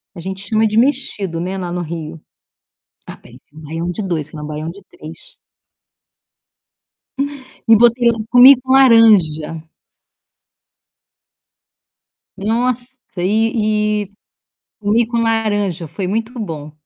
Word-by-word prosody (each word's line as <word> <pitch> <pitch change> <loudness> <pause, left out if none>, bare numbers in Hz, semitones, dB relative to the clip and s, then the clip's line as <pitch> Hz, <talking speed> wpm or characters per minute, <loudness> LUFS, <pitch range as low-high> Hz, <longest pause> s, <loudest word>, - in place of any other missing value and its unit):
A - - -9
gente 190 +2 -6
chama 220 +1 +1
de 215 +1 -1
mexido, 230 - 0
né, 185 +3 -4
lá 175 -2 -5
no 180 0 -3
Rio. 165 -1 -7 0.9
Ah, - - -10
parece - - -18
um 155 - -12
baião-de-dois, 165 +1 -4
se - - -14
não 150 - -7
um - - -6
baião-de-três 190 - -9 2.3
E 225 - +7
botei 235 +1 +4 0.2
comi 250 +2 +8
com 260 0 -2
laranja. 205 - +4 2.7
Nossa, 245 +5 -2 0.2
e 210 +2 0
e - - -17 0.7
comi 220 +3 +1
com 235 0 -3
laranja, 205 -7 -1
foi 170 +5 -5
muito 225 +4 -3
bom. 155 -8 -6
205 Hz, 110 wpm, -17 LUFS, 170-230 Hz, 2.7 s, comi